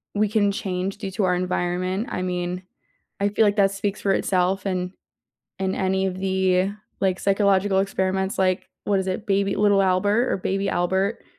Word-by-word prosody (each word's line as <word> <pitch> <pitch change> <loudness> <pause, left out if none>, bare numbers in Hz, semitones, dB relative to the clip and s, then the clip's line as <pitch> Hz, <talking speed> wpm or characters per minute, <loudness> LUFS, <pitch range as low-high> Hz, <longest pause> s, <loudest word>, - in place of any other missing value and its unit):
we 210 0 +2
can 205 -1 +2
change 190 -1 -3
due 200 -2 -5
to 205 +2 -1
our 180 -1 +2
environment. 180 +3 -1
I - - -2
mean, 180 0 -3 0.6
I 200 +1 +2
feel 215 +2 +3
like 205 -1 +2
that 195 -1 +4
speaks 200 +1 -3
for 195 - +1
itself, 190 0 +1
and 180 -2 -2 0.7
in 190 0 -1
any 190 0 0
of 185 -1 -3
the, 190 0 +1 0.3
like, 190 -1 +1
psychological 195 -1 +2
experiments, 190 +1 -1
like, 185 -1 +1 0.2
what 200 -1 +2
is 190 - -4
it, 190 +3 -3
baby 195 0 +1
Little 205 -1 +4
Albert 205 +6 +2
or - - +1
baby 195 +1 -1
Albert, 190 +4 0
190 Hz, 180 wpm, -23 LUFS, 185-200 Hz, 0.7 s, that